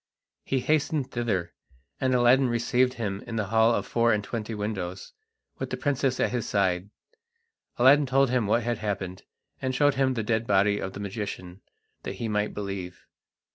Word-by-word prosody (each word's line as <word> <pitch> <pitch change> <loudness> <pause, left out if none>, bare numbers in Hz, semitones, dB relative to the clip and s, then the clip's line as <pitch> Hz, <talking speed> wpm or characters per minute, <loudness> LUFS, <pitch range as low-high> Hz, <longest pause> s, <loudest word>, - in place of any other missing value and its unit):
He 135 -1 -1
hastened 150 -1 0
thither, 100 -8 -2 0.5
and 130 -1 +1
Aladdin 125 +2 +4
received 120 +2 +1
him 100 -4 -3
in 115 - -5
the 110 -2 0
hall 115 +1 +5
of - - -2
the - - -15
four 115 0 +3
and 105 -1 +1
twenty 110 0 -4
windows, 95 -3 -4 0.5
with - - -3
the - - -3
princess 135 -2 0
at - - +1
his 120 -3 -2
side. 95 -1 +1 0.9
Aladdin 140 +3 +6
told 135 0 +3
him 125 -5 +1
what 115 +3 +2
had 120 -1 -1
happened, 100 -3 -4 0.4
and 130 -1 -1
showed 145 +1 +4
him 130 -1 +1
the 115 - -1
dead 110 +1 0
body 100 +1 +3
of 95 - -4
the - - -8
magician, 100 -3 -6 0.4
that - - -5
he 115 - -4
might 105 -1 -1
believe. 95 -3 -6
115 Hz, 180 wpm, -27 LUFS, 100-125 Hz, 0.9 s, Aladdin